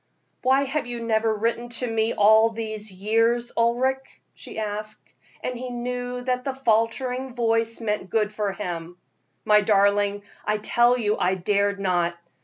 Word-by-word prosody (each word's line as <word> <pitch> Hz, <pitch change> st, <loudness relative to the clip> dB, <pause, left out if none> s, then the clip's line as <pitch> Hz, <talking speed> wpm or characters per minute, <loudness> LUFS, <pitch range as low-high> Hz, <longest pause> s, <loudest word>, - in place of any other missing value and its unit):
"Why 265 Hz, +2 st, +3 dB
have 275 Hz, -1 st, -2 dB
you 240 Hz, -1 st, -4 dB
never 220 Hz, 0 st, +2 dB
written 230 Hz, +3 st, -1 dB
to 250 Hz, -, -2 dB
me 225 Hz, -1 st, 0 dB
all 220 Hz, +2 st, +6 dB
these 220 Hz, -2 st, -5 dB
years, 230 Hz, +5 st, +1 dB
Ulric?" 255 Hz, +3 st, 0 dB
she -, -, -10 dB
asked, 215 Hz, 0 st, -5 dB, 0.4 s
and 250 Hz, -, -2 dB
he 250 Hz, +1 st, -5 dB
knew 245 Hz, 0 st, -4 dB
that 250 Hz, 0 st, -1 dB
the 270 Hz, 0 st, -3 dB
faltering 250 Hz, +1 st, 0 dB
voice 230 Hz, -1 st, +1 dB
meant 210 Hz, -4 st, -2 dB
good 215 Hz, +1 st, 0 dB
for 210 Hz, -2 st, -1 dB
him. 175 Hz, -3 st, -6 dB, 0.5 s
"My 210 Hz, 0 st, +5 dB
darling, 205 Hz, 0 st, +2 dB, 0.2 s
I 210 Hz, 0 st, 0 dB
tell 240 Hz, +3 st, +3 dB
you 215 Hz, -3 st, 0 dB
I 185 Hz, +1 st, +2 dB
dared 200 Hz, +2 st, 0 dB
not. 175 Hz, -3 st, 0 dB
225 Hz, 155 wpm, -24 LUFS, 205-245 Hz, 0.5 s, all